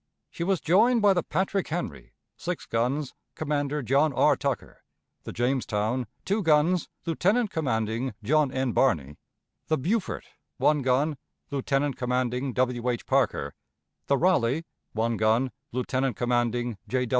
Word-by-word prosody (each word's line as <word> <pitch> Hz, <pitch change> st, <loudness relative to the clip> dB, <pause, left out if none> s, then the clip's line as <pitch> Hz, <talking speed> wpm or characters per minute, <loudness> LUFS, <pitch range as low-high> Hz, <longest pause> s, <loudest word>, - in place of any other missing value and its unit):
She -, -, -4 dB
was 190 Hz, 0 st, +1 dB
joined 220 Hz, +7 st, +4 dB
by 200 Hz, -1 st, +6 dB
the 175 Hz, -, +1 dB
Patrick 190 Hz, +3 st, -1 dB
Henry, 155 Hz, -, -5 dB, 0.2 s
six -, -, -4 dB
guns, 125 Hz, +5 st, -1 dB, 0.2 s
Commander 145 Hz, -1 st, -1 dB
John 140 Hz, +5 st, +3 dB
R. -, -, +4 dB
Tucker; -, -, -3 dB, 0.4 s
the -, -, -5 dB
Jamestown, 120 Hz, -1 st, 0 dB, 0.2 s
two 205 Hz, +3 st, +1 dB
guns. 160 Hz, +1 st, +3 dB, 0.2 s
Lieutenant 195 Hz, +7 st, +1 dB
commanding 115 Hz, -, -1 dB
John 145 Hz, +4 st, +3 dB
N. 130 Hz, -1 st, 0 dB
Barney; 75 Hz, -, +1 dB, 0.5 s
the 155 Hz, -, +2 dB
Beaufort, 190 Hz, -, -1 dB, 0.3 s
one 150 Hz, -1 st, +3 dB
gun, 135 Hz, +4 st, +1 dB, 0.3 s
Lieutenant 140 Hz, 0 st, 0 dB
commanding 125 Hz, +1 st, -1 dB
W. 125 Hz, -1 st, 0 dB
H. 120 Hz, -2 st, -2 dB
Parker; -, -, +1 dB, 0.5 s
the 140 Hz, -, +3 dB
Raleigh, 160 Hz, -3 st, +2 dB, 0.3 s
one 115 Hz, +1 st, 0 dB
gun, 110 Hz, +5 st, +2 dB, 0.2 s
Lieutenant 130 Hz, 0 st, -1 dB
commanding 120 Hz, -2 st, 0 dB
J. 125 Hz, +4 st, 0 dB
135 Hz, 135 wpm, -27 LUFS, 120-155 Hz, 0.5 s, by